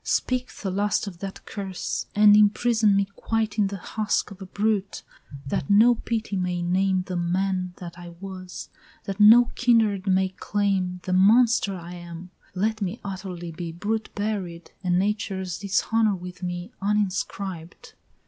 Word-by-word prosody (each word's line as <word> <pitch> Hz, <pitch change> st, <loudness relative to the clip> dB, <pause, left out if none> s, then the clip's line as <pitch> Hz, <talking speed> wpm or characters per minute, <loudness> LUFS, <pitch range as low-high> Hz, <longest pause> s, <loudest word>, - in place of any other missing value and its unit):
Speak 255 Hz, 0 st, -1 dB
the 195 Hz, -, -5 dB
last 205 Hz, +3 st, 0 dB
of 185 Hz, -4 st, -8 dB
that 195 Hz, 0 st, -7 dB
curse! 195 Hz, -3 st, -4 dB
and 210 Hz, 0 st, +7 dB
imprison 210 Hz, 0 st, +4 dB
me 200 Hz, 0 st, +3 dB
quite 220 Hz, -1 st, -1 dB
In 205 Hz, -, +4 dB
the 200 Hz, 0 st, -5 dB
husk 210 Hz, +3 st, -2 dB
of 195 Hz, 0 st, -12 dB
a 190 Hz, -, -7 dB
brute, 205 Hz, 0 st, -1 dB, 0.4 s
that 135 Hz, -, -2 dB
no 220 Hz, +4 st, +6 dB
pity 220 Hz, -2 st, -3 dB
may 180 Hz, -2 st, -1 dB
name 185 Hz, +1 st, +1 dB
The 185 Hz, -1 st, -5 dB
man 180 Hz, +1 st, -1 dB
that 175 Hz, -1 st, -9 dB
I 175 Hz, 0 st, -9 dB
was, 185 Hz, -2 st, -8 dB, 0.3 s
that 195 Hz, +1 st, -5 dB
no 230 Hz, +3 st, +7 dB
kindred 220 Hz, -6 st, +2 dB
may 190 Hz, 0 st, +3 dB
claim 190 Hz, -2 st, -1 dB
"The 185 Hz, -, -2 dB
monster 215 Hz, +1 st, +4 dB
I 175 Hz, 0 st, -8 dB
am! 175 Hz, 0 st, -9 dB, 0.2 s
Let 215 Hz, +3 st, 0 dB
me 195 Hz, +4 st, -3 dB
utterly 185 Hz, -3 st, -6 dB
be 170 Hz, 0 st, -6 dB
Brute 215 Hz, +6 st, -3 dB
buried, 195 Hz, -5 st, -4 dB
and 180 Hz, -1 st, +2 dB
Nature's 190 Hz, -2 st, -2 dB
dishonor 205 Hz, +2 st, +1 dB
with 180 Hz, 0 st, -9 dB
me 175 Hz, +3 st, -4 dB
Uninscribed!" 195 Hz, -4 st, -3 dB
195 Hz, 155 wpm, -25 LUFS, 180-210 Hz, 0.4 s, and